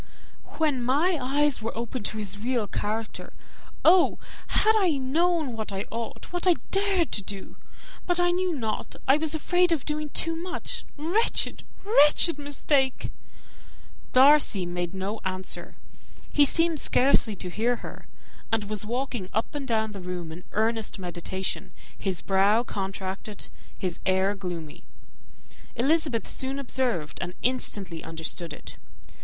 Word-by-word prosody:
"When 295 Hz, -5 st, +1 dB
my 305 Hz, +7 st, +2 dB
eyes 280 Hz, 0 st, +2 dB
were 225 Hz, +1 st, -4 dB
opened 235 Hz, -1 st, -3 dB
to 220 Hz, -, -5 dB
his 205 Hz, -2 st, -1 dB
real 240 Hz, 0 st, 0 dB
character, 215 Hz, +2 st, -4 dB, 0.5 s
oh! 350 Hz, +2 st, +6 dB, 0.3 s
had 440 Hz, -, +4 dB
I 365 Hz, -9 st, +3 dB
known 305 Hz, 0 st, +1 dB
what 220 Hz, -2 st, -4 dB
I 195 Hz, +1 st, -3 dB
ought, 230 Hz, +8 st, -6 dB
what 355 Hz, +1 st, 0 dB
I 355 Hz, -, +6 dB, 0.2 s
dared 390 Hz, -4 st, +2 dB
to 205 Hz, -, +1 dB
do! 195 Hz, 0 st, -7 dB, 0.5 s
But 355 Hz, -1 st, +3 dB
I 350 Hz, 0 st, +4 dB
knew 365 Hz, +1 st, 0 dB
not 225 Hz, -9 st, -3 dB
I 270 Hz, +2 st, +6 dB
was 315 Hz, 0 st, +1 dB
afraid 355 Hz, +3 st, +2 dB
of 320 Hz, -5 st, 0 dB
doing 300 Hz, 0 st, -2 dB
too 330 Hz, +3 st, 0 dB
much. 355 Hz, +2 st, -4 dB
Wretched, 350 Hz, +10 st, +1 dB, 0.2 s
wretched 310 Hz, -4 st, +5 dB
mistake!" 285 Hz, -2 st, 0 dB, 1.0 s
Darcy 265 Hz, -8 st, +5 dB
made 175 Hz, +1 st, -3 dB
no 195 Hz, +3 st, -3 dB
answer. 185 Hz, 0 st, -3 dB, 0.6 s
He 290 Hz, -, +6 dB
seemed 330 Hz, +1 st, +3 dB
scarcely 250 Hz, -6 st, +3 dB
to 180 Hz, -1 st, -4 dB
hear 235 Hz, +6 st, +1 dB
her, -, -, -10 dB, 0.4 s
and 225 Hz, -2 st, +1 dB
was 210 Hz, -1 st, -1 dB
walking 240 Hz, -3 st, -3 dB
up 220 Hz, -, -1 dB
and 285 Hz, -2 st, -4 dB
down 220 Hz, -2 st, +1 dB
the 200 Hz, -2 st, -8 dB
room 180 Hz, -2 st, -5 dB
in 170 Hz, +3 st, -10 dB
earnest 220 Hz, 0 st, 0 dB
meditation; 185 Hz, +1 st, -4 dB, 0.2 s
his 190 Hz, -4 st, 0 dB
brow 200 Hz, +4 st, +3 dB
contracted, 195 Hz, 0 st, -5 dB, 0.3 s
his 180 Hz, -3 st, -3 dB
air 190 Hz, +1 st, +3 dB
gloomy. 175 Hz, -6 st, -6 dB, 0.9 s
Elizabeth 275 Hz, -1 st, +1 dB
soon 270 Hz, +1 st, -2 dB
observed, 245 Hz, -, -2 dB
and 180 Hz, 0 st, -5 dB
instantly 205 Hz, -9 st, -1 dB
understood 165 Hz, +1 st, -3 dB
it. -, -, -10 dB
235 Hz, 140 wpm, -26 LUFS, 195-300 Hz, 1.0 s, oh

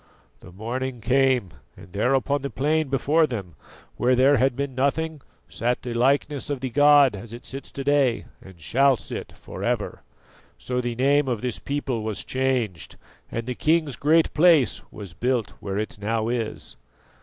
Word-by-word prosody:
The -, -, -14 dB
morning 120 Hz, +6 st, -4 dB
came 125 Hz, -4 st, +2 dB, 0.3 s
and 90 Hz, -, -14 dB
there 125 Hz, +7 st, +2 dB
upon 140 Hz, +1 st, 0 dB
the 140 Hz, -, -3 dB
plain 155 Hz, +3 st, 0 dB
before 145 Hz, +4 st, +2 dB
them, 100 Hz, -, -6 dB, 0.4 s
where 125 Hz, +1 st, +3 dB
there 135 Hz, +3 st, +5 dB
had 130 Hz, +1 st, +2 dB
been 140 Hz, 0 st, -3 dB
nothing, 145 Hz, +4 st, -1 dB, 0.3 s
sat 120 Hz, +1 st, -2 dB
the 120 Hz, -1 st, -4 dB
likeness 140 Hz, +4 st, +1 dB
of 145 Hz, -2 st, -2 dB
the 130 Hz, -1 st, -4 dB
god 145 Hz, -2 st, +6 dB
as 110 Hz, +3 st, -9 dB
it 120 Hz, -, -10 dB
sits 135 Hz, +1 st, -8 dB
to 135 Hz, -, -5 dB
day 140 Hz, -4 st, +2 dB, 0.2 s
and 95 Hz, -3 st, -14 dB
shall 130 Hz, -, +3 dB
sit -, -, -7 dB
for -, -, -9 dB
ever. -, -, -2 dB, 0.6 s
So 125 Hz, 0 st, -2 dB
the 120 Hz, -1 st, -3 dB
name 140 Hz, +3 st, +3 dB
of 120 Hz, -4 st, -1 dB
this 125 Hz, -2 st, -3 dB
people 135 Hz, -5 st, -3 dB
was 110 Hz, -1 st, -3 dB
changed, 125 Hz, -, -1 dB, 0.4 s
and 115 Hz, 0 st, -3 dB
the 125 Hz, -, -3 dB
king's 155 Hz, +1 st, +1 dB
Great 160 Hz, +3 st, +3 dB
Place 155 Hz, -6 st, +4 dB
was 100 Hz, -5 st, -9 dB
built 125 Hz, +2 st, -1 dB
where 100 Hz, -1 st, -4 dB
it 105 Hz, 0 st, -4 dB
now 110 Hz, +2 st, -1 dB
is. 115 Hz, -, -4 dB
130 Hz, 175 wpm, -24 LUFS, 115-140 Hz, 0.6 s, god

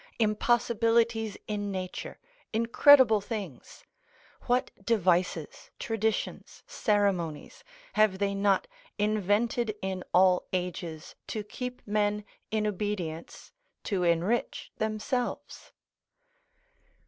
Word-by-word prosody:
Impossibilities 230 Hz, 0 st, +2 dB
in 205 Hz, -1 st, -2 dB
nature, 185 Hz, -1 st, -5 dB, 0.4 s
incredible 230 Hz, 0 st, +6 dB
things; 200 Hz, -, -7 dB, 0.6 s
what 250 Hz, +1 st, +1 dB
devices, 180 Hz, -7 st, 0 dB
traditions, 220 Hz, -1 st, -3 dB
ceremonies, 200 Hz, -, -1 dB, 0.3 s
have 215 Hz, -3 st, +3 dB
they 200 Hz, 0 st, 0 dB
not 200 Hz, -, +2 dB, 0.3 s
invented 215 Hz, +2 st, +1 dB
in 190 Hz, -1 st, -3 dB
all 180 Hz, 0 st, +4 dB
ages 175 Hz, -3 st, -4 dB
to 215 Hz, -, -3 dB
keep 250 Hz, +4 st, -7 dB
men 210 Hz, 0 st, 0 dB, 0.2 s
in 215 Hz, -1 st, 0 dB
obedience, 190 Hz, -5 st, -4 dB, 0.3 s
to 195 Hz, -4 st, -1 dB
enrich 175 Hz, +7 st, 0 dB
themselves? 220 Hz, +3 st, -3 dB
210 Hz, 85 wpm, -29 LUFS, 185-225 Hz, 0.6 s, incredible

